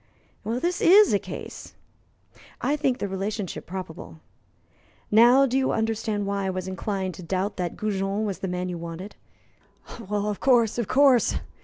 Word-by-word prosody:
Well, 230 +3 -2
this 350 +5 -1
is 405 +4 +6
a - - +3
case." - - -9 0.8
"I 290 - 0
think 275 -4 0
the 200 - -3
relationship 195 0 -4
probable. 160 - -8 0.9
Now 240 +5 +6
you 265 0 +1
understand 220 -2 -1
why 200 -1 -2
I - - 0
was 185 0 -4
inclined 190 0 -3
to 185 - -10
doubt 185 +3 -2
that 175 -2 -3
Goujon 200 0 -1
was 200 -3 -4
the 190 - -3
man 180 0 -3
you 175 -2 -5
wanted." 170 +4 -8 0.8
"Of 210 -1 -3
course, 240 -4 +3
of 230 - -1
course! 265 -2 +4
205 Hz, 155 wpm, -25 LUFS, 185-235 Hz, 0.9 s, is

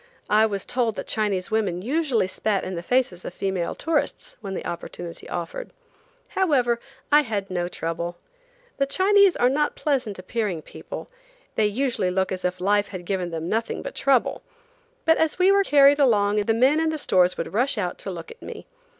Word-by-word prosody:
I 215 +1 +5
was 200 -3 -3
told 235 -4 0
that - - -5
Chinese 205 -4 -1
women 195 -5 0
usually 265 - +1
spat 200 +1 -1
in 185 - -4
the 170 - -4
faces 215 -4 0
of 180 - -7
female 190 -3 -2
tourists 320 -1 -1
when 195 -2 -5
the - - -5
opportunity 170 0 -7
offered. - - -5 0.6
However, 255 -11 +2 0.3
I 295 +1 +7
had 205 -7 -3
no 175 -1 -1
trouble. 170 0 -4 0.6
The 275 - +1
Chinese 395 +4 +4
are 245 - +3
not 295 +3 +1
pleasant 255 -9 -1
appearing 185 -3 -3
people; - - -8 0.5
they 215 - +2
usually 235 -3 0
look 190 +1 0
as 185 -1 -4
if 180 0 -1
life 205 +2 +2
had 185 -3 -8
given 185 -1 -2
them 165 0 -4
nothing 225 +4 -2
but - - -6
trouble; 270 -3 +1 0.6
but 325 0 +4
as 320 -1 +1
we 370 +2 +5
were 400 0 +4
carried 285 -3 +6
along 210 -6 +3
the 210 +2 +2
men 265 +6 +4
in 320 0 +1
the 315 - -2
stores 180 -10 +3
would 165 - -4
rush 250 +4 +1
out 180 -4 -2
to - - -5
look 170 -3 -7
at 470 - -14
me. - - -8
215 Hz, 190 wpm, -24 LUFS, 185-275 Hz, 0.6 s, I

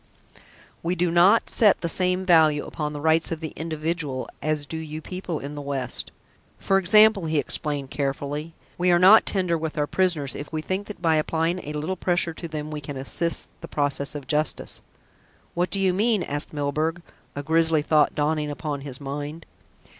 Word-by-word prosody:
"We 175 +2 -1
do 175 -1 0
not 185 +6 +5
set 210 -4 +3
the 170 - -1
same 180 +2 +3
value 160 -4 +4
upon 150 -2 -4
the 145 - -6
rights 160 +3 +2
of 165 - -2
the 160 -1 -6
individual 155 -4 -3
as 155 -1 -1
do 160 - -6
you 155 -1 -6
people 180 0 -5
in 145 0 -6
the 145 - -6
West. 140 -3 -4 0.5
For 195 0 +2
example," 210 0 +5
he 155 0 0
explained 145 -2 -2
carefully, 145 +3 -3 0.2
"we 180 +1 +2
are 175 - +5
not 190 +5 +7
tender 180 -4 +1
with 160 -1 -4
our 150 - +1
prisoners, 160 -5 +1
if 145 - -7
we 155 -1 -3
think 190 +4 -3
that 205 -4 -9
by 160 -2 +3
applying 165 +3 0
a 150 -3 -7
little 155 +5 -2
pressure 175 -2 0
to 170 - -7
them 155 -1 -5
we 150 -1 -5
can 145 -1 -6
assist 165 +5 -1
the 165 - -7
process 145 -1 -1
of 145 -2 -6
justice." 150 +2 -2 0.7
"What 175 +1 0
do 195 - +2
you 190 -1 +2
mean?" 215 +1 +2
asked 145 +1 -3
Milburgh, 155 +3 -2 0.3
a 145 - -4
grisly 160 0 +2
thought 150 -1 +3
dawning 150 0 0
upon 145 -1 -4
his 135 -2 -7
mind. 145 +3 -6
160 Hz, 190 wpm, -24 LUFS, 145-175 Hz, 0.7 s, not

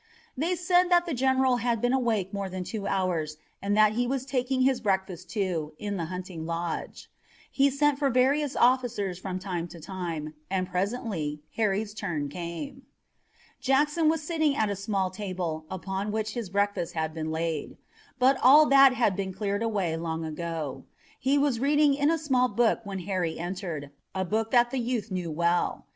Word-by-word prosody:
They 330 +7 0
said 355 +1 +3
that 350 -1 +4
the 340 - -3
general 260 0 +3
had 235 -1 0
been 245 +3 +1
awake 225 -7 0
more 200 -1 -3
than 185 0 -4
two 200 +2 -4
hours 170 -5 -1 0.2
and 205 +1 0
that 215 -1 +6
he 240 +3 0
was 265 0 -2
taking 260 -1 0
his 260 -1 +2
breakfast, 190 -3 -1
too, 180 -8 -2
in 205 -1 -3
the 170 - -2
hunting 180 -2 -6
lodge. 170 0 -4 0.4
He 280 0 +4
sent 280 +1 +2
for 280 -2 +2
various 270 +3 +2
officers 240 -7 +2
from 185 -1 -4
time 180 -3 -3
to 170 - -11
time, 165 -4 -5 0.2
and 185 -1 -1
presently 180 -6 -2
Harry's 210 -1 0
turn 170 -9 -3
came. 175 - -6 0.8
Jackson 295 +5 +2
was 320 -1 0
sitting 315 -3 +1
at 215 -5 +1
a - - -1
small 195 -1 -1
table, 180 -5 -4
upon 190 +2 -3
which 215 0 -2
his 230 -6 -4
breakfast 200 -3 -1
had 160 -1 -1
been 160 -1 -4
laid. 160 -1 -3 0.4
But 260 +1 +4
all 290 +5 +8
that 275 -1 +7
had 220 -6 +2
been 190 0 -3
cleared 200 +1 -2
away 200 -8 0
long 165 0 -3
ago. 160 -2 -4 0.4
He 270 +2 +2
was 280 -5 +2
reading 290 +2 +4
in 285 +1 +2
a 330 - +2
small 260 -5 +2
book 240 -2 +2
when 195 -2 -4
Harry 180 -3 -2
entered, 170 -5 -5 0.2
a 190 0 0
book 220 +4 -1
that 240 0 +4
the 265 - -1
youth 230 -4 -2
knew 180 -2 -2
well. 170 +2 0
205 Hz, 180 wpm, -27 LUFS, 175-260 Hz, 0.8 s, all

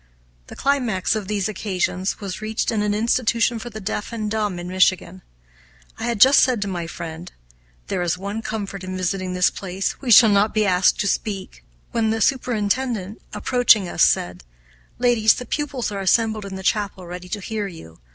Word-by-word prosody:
The - - -10
climax 245 -10 0
of 210 -3 -4
these 205 -2 -1
occasions 190 -2 -2
was 200 -1 -6
reached 220 +2 -1
in 220 -2 0
an 210 0 0
institution 230 +1 +1
for 240 - -7
the 220 -1 -8
deaf 210 +2 -4
and 215 -2 -3
dumb 210 -4 -1
in 175 0 -6
Michigan. 185 0 +1 0.8
I - - -3
had 235 -3 -1
just 265 +6 +8
said 250 -3 +3
to - - -5
my 175 -3 -4
friend, 165 +1 -8 0.5
"There 180 - -2
is 175 0 0
one 200 +4 -4
comfort 200 -3 -5
in 185 0 -5
visiting 185 0 -2
this 180 -1 +3
place; 190 0 -4
we 265 - -4
shall 220 0 +8
not 205 +2 +2
be 215 -1 +3
asked 185 -1 +3
to 200 - 0
speak," 195 - -3 0.3
when 225 -1 +1
the 225 +1 0
superintendent, 225 -3 -1
approaching 240 -6 +3
us, 175 - -3
said, 90 -5 +2 0.5
"Ladies, 235 -3 +4
the 250 - -6
pupils 275 -7 -3
are 200 -1 -4
assembled 220 +1 +1
in 195 -1 -7
the 190 - -7
chapel, 200 -3 -1
ready 180 +1 -8
to 210 - -3
hear 210 +1 -4
you. 80 - -12
205 Hz, 190 wpm, -22 LUFS, 185-225 Hz, 0.8 s, just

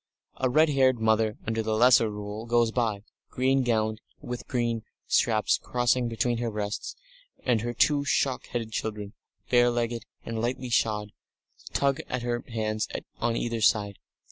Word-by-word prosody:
A 130 - +1
red 155 +5 +4
haired 130 -3 +3
mother 110 -1 +2
under 110 0 -1
the 110 0 -1
Lesser 120 -1 +5
Rule 105 +2 -6
goes 120 -1 +3
by, 110 -4 -1 0.3
green 135 +1 +2
gowned, 110 -3 0 0.2
with 120 0 -5
dark - - -13
green 120 -3 -1 0.2
straps 110 -2 +2
crossing 125 0 +1
between 115 +1 0
her 120 -1 -1
breasts, 105 -1 -4 0.5
and 120 -4 +2
her 120 +1 -2
two 145 +2 +3
shock 135 -2 0
headed 115 -2 -4
children, 105 -2 -4 0.4
bare 120 -1 +5
legged 120 -1 -2 0.2
and 115 -1 -3
lightly 125 +1 -2
shod, 105 -2 +1 0.6
tug 140 -1 +1
at 125 -1 -2
her 120 0 -2
hands 110 -2 -1 0.3
on 115 0 0
either 115 -1 -2
side. 105 -2 +2
115 Hz, 160 wpm, -27 LUFS, 110-125 Hz, 0.6 s, Lesser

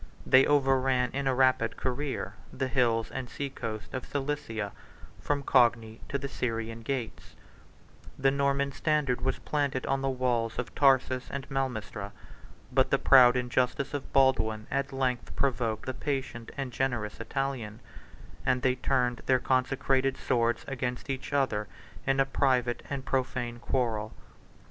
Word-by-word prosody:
They 130 +1 +6
overran 135 -3 +2
in 140 0 -2
a 130 - +2
rapid 130 -3 +2
career 135 +2 -3 0.2
the 130 - -2
hills 120 -4 +1
and 130 -2 -5
sea 140 +2 -4
coast 110 -4 -6
of 130 - -3
Cilicia, 135 -8 -3 0.5
from 145 -1 -1
Cogni 115 -4 +3
to 140 - 0
the 140 0 -4
Syrian 115 -3 -3
gates: 120 -1 -5 0.8
the 135 0 +3
Norman 140 0 +1
standard 140 -2 0
was 130 +1 0
first - - -18
planted 140 -3 0
on 135 0 0
the 135 - 0
walls 125 -3 0
of 125 - -4
Tarsus 130 -2 +3
and 140 -1 -5
Malmistra; 110 -6 -3 0.6
but - - +3
the - - +3
proud 125 -2 +7
injustice 125 +2 0
of 145 -2 -5
Baldwin 110 -5 +3
at 140 +1 -1
length 130 -2 -2
provoked 120 -5 0
the 130 - -2
patient 130 -4 -3
and 135 -2 -3
generous 120 -5 -2
Italian; 120 -3 -3 0.6
and 125 -1 +1
they 130 - +4
turned 125 -1 0
their 130 - +5
consecrated 135 +1 +1
swords 120 0 0
against 125 0 -3
each 130 +1 -5
other 130 -7 +1 0.4
in 135 0 +2
a 135 - +5
private 125 -3 +1
and 140 -2 -4
profane 125 -2 -2
quarrel. 115 -4 -1
130 Hz, 150 wpm, -29 LUFS, 120-135 Hz, 0.8 s, proud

